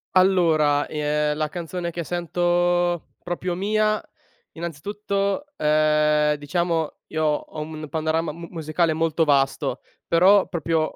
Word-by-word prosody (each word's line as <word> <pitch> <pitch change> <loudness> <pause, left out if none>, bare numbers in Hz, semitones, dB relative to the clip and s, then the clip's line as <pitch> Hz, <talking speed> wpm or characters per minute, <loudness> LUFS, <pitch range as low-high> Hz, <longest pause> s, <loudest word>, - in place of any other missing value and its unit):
Allora, 165 -6 +4
ehm, 150 0 -1
la 155 -1 -1
canzone 170 +1 -4
che 170 0 -4
sento 175 0 0
proprio 175 0 -3
mia 215 +3 +1 0.5
innanzitutto, 200 - -3
ehm, 150 0 +3
diciamo, 165 +1 -2
io 155 0 -1
ho 150 +1 -2
un 150 - -6
mn 155 - -7
panorama 160 0 -1
mu 170 +2 -9
musicale 160 0 0
molto 160 0 +1
vasto, 140 -2 +1 0.3
però 190 +4 +5
proprio 165 -3 -1
165 Hz, 120 wpm, -23 LUFS, 150-175 Hz, 0.5 s, però